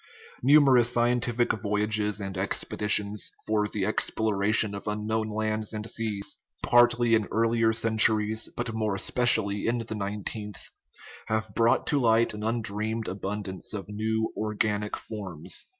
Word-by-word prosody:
Numerous 135 -3 +5
sci 120 0 +2
entific 120 -3 0
voyages 105 0 0
and 95 -1 -5
expeditions 105 +2 0 0.2
for 105 -1 +1
the 105 -2 -2
exploration 105 0 +1
of 100 +1 -7
unknown 110 +1 -2
lands 110 0 -2
and 105 0 -5
seas, 110 -3 -2 0.3
partly 120 -1 +4
in 110 -2 +2
earlier 115 0 +2
centuries, 110 -1 +2
but 120 -1 -3
more 110 -2 -1
especially 105 -2 +1
in 120 +1 +1
the 115 -1 -5
nineteenth, 105 0 -5 0.6
have 110 -1 -2
brought 115 +3 +2
to 145 - +2
light 115 -2 +3
an 105 - -7
undreamed 110 0 -2
abundance 100 +1 -4
of 100 -1 -7
new 110 +1 -2
organic 105 -1 -1
forms. 95 -8 -5
110 Hz, 135 wpm, -27 LUFS, 105-115 Hz, 0.6 s, Numerous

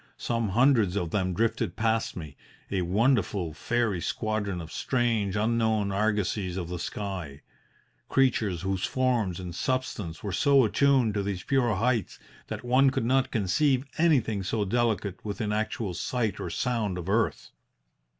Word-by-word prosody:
Some 115 -3 -1
hundreds 115 -3 +3
of 85 -5 -2
them 95 -3 0
drifted 115 +3 0
past 115 0 0
me, 75 -5 -8 0.4
a 95 -2 0
wonderful 100 - +1
fairy 110 +1 -1
squadron 110 -4 -2
of 80 -2 -8
strange, 115 -2 0
unknown 110 -2 +1
argosies 100 -2 0
of 85 -2 -4
the 90 -1 -4
sky 90 -10 -5 0.7
creatures 110 -10 +1
whose 95 -1 -1
forms 120 -8 0
and 90 -2 -6
substance 105 -7 -3
were 100 - -3
so 140 - +4
attuned 130 -1 +3
to 100 - 0
these 100 -2 -3
pure 125 -6 +1
heights 115 +1 0 0.3
that - - -6
one 130 +3 +5
could 130 - -1
not 130 +2 +2
conceive 130 +6 +1
anything 125 -11 +2
so 105 +3 -1
delicate 105 -3 -1
within 105 0 -3
actual 110 -2 -2
sight 110 +1 -2
or - - -4
sound 105 0 -1
of 90 -1 -6
earth. 110 +4 0
105 Hz, 150 wpm, -27 LUFS, 95-120 Hz, 0.7 s, one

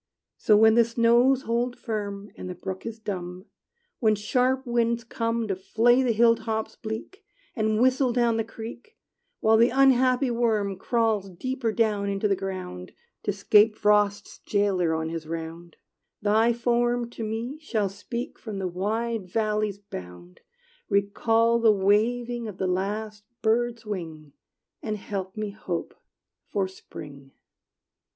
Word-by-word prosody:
So, 210 - +4
when 220 +1 +6
the 235 +1 +6
snows 235 +3 +3
hold 240 +2 -1
firm, 205 -3 -5
And 185 - -7
the 180 - -5
brook 190 +3 -6
is 225 -1 -5
dumb; 185 -3 -6 0.5
When 220 -4 +3
sharp 250 +5 +1
winds 235 -1 +1
come 230 -1 -2
To 195 - -1
flay 230 +7 +3
the 250 -2 +2
hill 230 +1 +5
tops 220 -1 -3
bleak, 225 - -7 0.3
And 215 -2 +1
whistle 255 +1 +3
down 235 -2 +2
the 225 - +1
creek; 235 - -10 0.4
While 220 0 +5
the 235 +2 +5
unhappy 260 0 +4
worm 215 -5 0
Crawls 220 -2 0
deeper 240 +5 -3
down 210 -3 +1
into 200 +1 0
the 200 - +2
ground, 185 - -6 0.3
To - - -1
'scape 210 +1 +4
Frost's 210 -1 +1
jailer 190 -5 +1
on 160 0 -2
his 165 -1 -5
round; 165 +1 -6 0.4
Thy 220 +3 +3
form 240 0 +1
to 230 - -6
me 230 +7 -4
shall 220 -10 -1
speak 205 +5 -6
From 215 -4 -6
the 190 -1 -2
wide 210 +3 -2
valley's 215 -1 0
bound, 90 - -10 0.5
Recall 225 +4 +2
the 225 -1 +5
waving 230 +4 +1
of 205 -4 -8
the 190 - -1
last 205 +3 -2 0.2
bird's 230 +1 +1
wing, 160 -8 -6 0.5
And 215 -1 -3
help 195 -1 -5
me 215 -1 -3
hope 185 -4 -5 0.5
for 195 -2 -1
spring. 140 -7 -12
215 Hz, 145 wpm, -26 LUFS, 195-235 Hz, 0.5 s, when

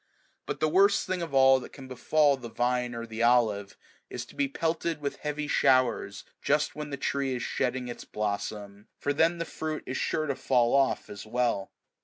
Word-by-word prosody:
But - - -3
the 155 - +2
worst 195 +5 +4
thing 185 -1 -2
of 165 -3 -4
all 135 -1 +6
that 125 - -11
can 135 -2 -10
befall 145 +3 +2
the 120 -3 -9
vine 125 +1 -1
or 115 0 -5
the 115 0 -6
olive, 115 -5 +2 0.3
is 120 -1 -5
to - - -17
be 280 -1 +1
pelted 165 - -2
with 140 -1 -4
heavy 150 0 -3
showers 130 -8 +2 0.2
just 150 +1 +1
when 150 -1 -5
the 140 - -4
tree 135 -1 -1
is 125 - -4
shedding 125 -1 -1
its 120 - -7
blossom, 105 -1 -4
for 145 - -1
then 165 +3 +3
the 170 - -3
fruit 155 -1 -4
is 130 - -3
sure 155 - 0
to 140 - 0
fall 125 -2 +2
oh01 135 -1 +2
as 105 +1 -8
well. 120 -4 0
130 Hz, 200 wpm, -28 LUFS, 120-150 Hz, 0.3 s, all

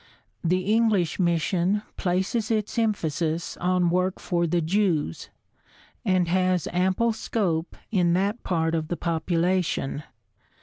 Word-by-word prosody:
The 180 +2 +2
English 210 -4 +2
mission 175 +3 +1
places 190 +5 -1
its 220 +1 0
emphasis 165 -6 -1
on 180 -1 +1
work 185 +1 0
for 170 -1 0
the 175 +2 +1
Jews 165 - 0 0.7
and 185 -2 +2
has 185 0 +1
ample 190 +6 +2
scope 180 -7 -2 0.2
in 175 -5 +3
that 200 +6 0
part 165 -2 0
of 160 -1 -1
the 175 - -3
population. 170 -3 0
180 Hz, 120 wpm, -25 LUFS, 170-195 Hz, 0.7 s, in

